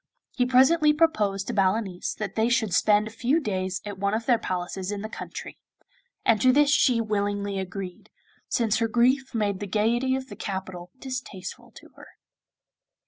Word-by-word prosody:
He 250 -2 0
presently 300 +5 +5
proposed 210 - +1
to 240 - -4
Balanice 195 -2 0
that 215 -2 -5
they 225 +1 +1
should 225 -6 +1
spend 210 +2 +4
a - - -8
few 245 +8 +1
days 190 - -2
at 205 -2 -6
one 200 +1 0
of 225 +1 -3
their 240 -3 +3
palaces 185 0 -4
in 205 0 -4
the - - -3
country; - - -8 0.7
and 220 -3 +3
to 255 - +6
this 290 +2 +4
she 255 -5 +4
willingly 205 -2 -1
agreed, 185 -1 -7 0.4
since 225 -3 +1
her 230 - +1
grief 255 +3 +2
made 205 -3 0
the 205 - -5
gaiety 235 +6 +1
of 265 0 -4
the - - -8
capital 190 -2 -6
distasteful 255 -8 -7
to - - -14
her. - - -14
215 Hz, 175 wpm, -26 LUFS, 195-250 Hz, 0.7 s, to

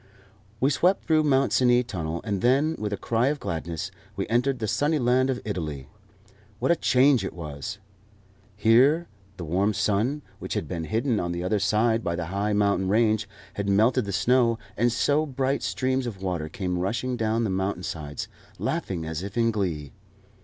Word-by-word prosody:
We 135 +3 +3
swept 180 +6 +2
through 155 -2 +3
Mont 135 -2 +3
Cenis 125 -1 +4
Tunnel, 85 -6 -4
and 100 -4 -2
then, 140 +6 +3
with 105 -1 -3
a 100 - -2
cry 115 +2 +1
of 145 +1 0
gladness, 85 -3 -4 0.2
we - - -2
entered 125 +3 +2
the 110 -3 -3
sunny 145 +9 +1
land 130 0 +2
of 130 -2 -1
Italy. 75 -10 -4 0.7
What - - +1
a - - +5
change 130 -5 +4
it 95 - -4
was! 85 +5 -6 0.8
Here 130 +11 +4 0.3
the 85 - -5
warm 95 +6 +1
sun, 110 +8 0 0.2
which - - -5
had - - -2
been 85 -3 -4
hidden 115 - 0
on 85 0 -2
the 85 0 -3
other 100 +3 +1
side 110 +3 +2
by 85 - -1
the 85 0 -3
high 100 +2 0
mountain 100 -2 +2
range, 110 0 +2 0.2
had 100 0 -2
melted 110 +5 +3
the 100 - -4
snow, 115 +3 +3 0.2
and 120 +2 +2
so 145 +6 +1
bright 135 0 -1
streams 130 -1 -1
of 95 -5 -7
water 85 -5 -2
came 90 +1 -3
rushing 120 +7 -1
down 115 0 0
the 105 - 0
mountain 95 -1 -2
sides, 75 -5 -5 0.3
laughing 85 -4 -2
as 80 +1 -4
if 100 +3 -6
in 115 -1 +3
glee. 85 -9 -2
110 Hz, 185 wpm, -26 LUFS, 95-125 Hz, 0.8 s, a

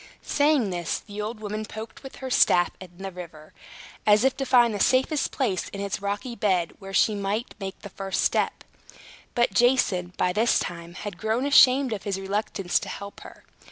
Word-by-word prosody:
Saying 285 -8 +2
this, 175 -2 -2
the 210 0 -7
old 215 +1 -5
woman 215 0 -4
poked 220 +1 -9
with 270 - -10
her 260 -1 -6
staff 175 -7 +4
in 185 - -10
the 195 +1 -6
river, 165 -4 -11 0.5
as 210 +1 +5
if 265 0 +3
to 270 - -2
find 240 -3 +5
the 205 - -3
safest 265 +7 +2
place 215 -10 -1
in 200 - -8
its 200 -1 -3
rocky 205 +5 -3
bed 185 -6 +1
where 195 -1 -9
she 215 +2 +3
might 200 +2 -2
make 195 -1 -5
the 200 - -8
first 195 -1 -2
step. - - 0 0.7
But 240 -4 +2
Jason, 190 -6 +2
by 180 - +1
this 225 +5 +3
time, 170 0 -5
had 200 -2 -7
grown 220 +4 0
ashamed 265 -2 +6
of 205 - -4
his 195 -2 -3
reluctance 195 -1 -1
to - - -7
help 200 0 -8
her. - - -13
205 Hz, 190 wpm, -25 LUFS, 190-240 Hz, 0.7 s, ashamed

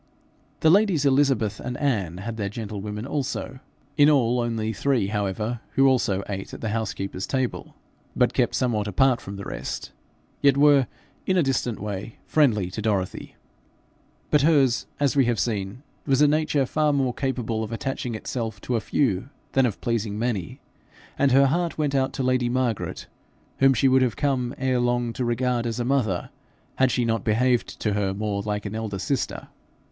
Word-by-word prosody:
The 160 - +5
ladies 190 -6 +3
Elizabeth 130 -6 +2
and 125 0 -5
Anne, 100 - -1
had 110 +4 -5
their 100 -2 -2
gentlewomen 105 0 -5
also, 135 -1 -3 0.4
in 145 0 +7
all 125 -4 +3
only 115 -2 -1
three, 120 -3 +1
however, 105 +3 -2
who 135 - +4
also 115 -7 +2
ate 95 -1 -5
at - - -10
the 115 - -2
housekeeper's 95 -3 -3
table, 130 -2 -2 0.4
but - - +2
kept - - +1
somewhat 110 -5 0
apart 125 +5 +2
from 100 - -7
the 100 0 -7
rest - - -5 0.5
yet 140 -1 +4
were, 145 -2 +5 0.4
in 185 - +2
a 175 - +4
distant 125 -5 -1
way, 105 +1 -5
friendly 110 - +2
to 110 - -5
Dorothy. 100 -4 -2 1.0
But 150 - +5
hers, 140 -5 +3
as 145 -2 +1
we 135 -2 +4
have 120 -2 0
seen, 105 +2 -2 0.2
was 135 -2 +3
a 150 - +6
nature 150 -2 +2
far 150 +3 +1
more 135 -3 +1
capable 120 -5 -2
of 110 - -6
attaching 125 0 -3
itself 110 -1 -4
to 125 - -2
a 115 - 0
few 110 -1 0 0.2
than 135 -1 +3
of 105 - -5
pleasing 115 -3 -1
many; 110 -7 -2 0.6
and 140 -1 +2
her 135 +2 +6
heart 170 +5 0
went 150 -2 0
out 135 -1 +1
to 135 - -2
lady 130 -1 +1
Margaret, 125 -3 -2 0.5
whom 135 -1 +5
she 135 - +3
would 130 0 +4
have 125 -5 +1
come 125 -1 -1
ere 130 -1 +1
long 120 -1 0
to 125 - -3
regard 120 0 0
as 115 0 -3
a 120 - -1
mother, 120 -9 0 0.5
had 130 -1 +4
she 125 -1 0
not 115 -2 0
behaved 120 +2 +1
to 105 - 0
her 100 -1 -1
more 105 -1 -2
like 105 0 -3
an 100 - -4
elder 110 -3 -3
sister. 130 +8 -3
120 Hz, 180 wpm, -24 LUFS, 105-135 Hz, 1.0 s, in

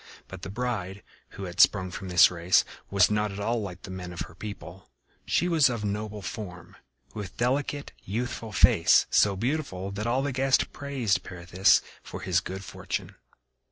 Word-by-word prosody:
But 95 -2 -10
the - - -6
bride, 100 -4 -3 0.3
who 100 - -6
had 90 -2 -7
sprung 95 -3 +5
from 95 +1 -6
this 90 0 +7
race, 90 +1 +3 0.2
was 100 0 +4
not 105 0 +1
at 100 - -7
all 115 +3 0
like 95 -2 -7
the 95 - -8
men 90 -1 -6
of 85 - -6
her - - -6
people. 95 -3 -9 0.4
She 175 - +2
was 160 -6 +4
of 115 -3 -3
noble 105 0 -4
form, 90 -6 -7 0.4
with 100 -3 -7
delicate 140 +3 -1
youthful 115 +2 -4
face, - - +5
so 100 -2 +4
beautiful 105 -5 -2
that 105 +3 -3
all 130 +3 +1
the 140 - -1
guests 130 +1 +3
praised 135 -8 -1
Pirithous 90 +2 +2 0.2
for - - -8
his 90 -1 +2
good 95 +2 -7
fortune. - - -5
100 Hz, 175 wpm, -27 LUFS, 95-120 Hz, 0.4 s, this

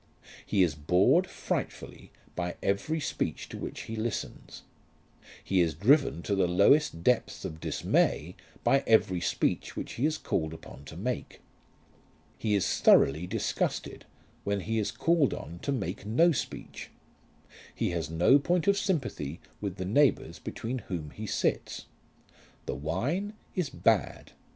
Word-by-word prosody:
He 95 - +2
is 85 -3 +1
bored 90 - +3
frightfully - - -5 0.2
by 90 -1 -3
every 100 +12 0
speech - - -3
to - - -7
which - - -5
he 115 - -6
listens. 110 0 -5 0.8
He 95 -2 +2
is 80 -4 +1
driven 100 - +3
to 100 - -1
the 95 -2 +2
lowest 90 - +3
depths 125 +3 +1
of 80 - -6
dismay - - 0 0.3
by 135 0 +3
every 95 -5 +3
speech 80 - -1
which - - -5
he 135 +6 +1
is 155 0 -1
called 80 0 -2
upon 70 -3 -12
to 80 - -10
make. 125 +7 -4 1.0
He 105 -2 +1
is 100 - +1
thoroughly 80 +6 +5
disgusted 110 +3 -2 0.4
when 100 -1 -1
he 110 +4 -1
is 105 - 0
called 165 -5 +2
on 85 +3 -8
to 140 - -2
make 100 -8 -3
no 125 +12 +4
speech. 140 - -5 0.9
He - - 0
has 85 -4 -2
no 85 - +5
point 175 +3 +1
of 200 0 +4
sympathy 125 - -2 0.2
with 100 -4 -3
the 95 -2 -4
neighbours 140 +9 +2
between 125 +3 -4
whom 80 -9 -5
he 110 0 -7
sits. - - -1 0.8
The - - -2
wine 120 - -2 0.2
is 180 -7 -1
bad. - - 0
100 Hz, 145 wpm, -29 LUFS, 85-140 Hz, 1.0 s, thoroughly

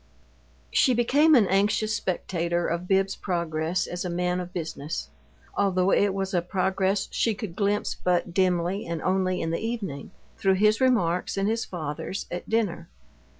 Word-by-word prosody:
She 255 -3 +4
became 290 +7 +4
an 230 -6 +6
anxious 205 +3 +1
spectator 175 -2 -1
of 170 +2 -2
Bibbs's 195 0 +2
progress 170 0 -1
as 175 0 -4
a 180 - -3
man 180 +1 0
of 180 0 -6
business, 160 - -5 0.5
although 190 -1 +2
it 200 -1 +3
was 195 0 -2
a 175 - +2
progress 190 +2 0
she 225 -2 +1
could 200 -5 -6
glimpse 205 +1 0
but 175 -1 +1
dimly 185 +1 +1
and 170 -1 -3
only 185 -1 +1
in 165 - -2
the 165 - -1
evening, 200 -12 -4 0.3
through 190 -1 +3
his 215 +4 +3
remarks 195 -10 +2
and 195 0 +1
his 225 +1 0
father's 165 +3 -5
at 175 - -5
dinner. 205 -7 -1
185 Hz, 160 wpm, -26 LUFS, 175-205 Hz, 0.5 s, an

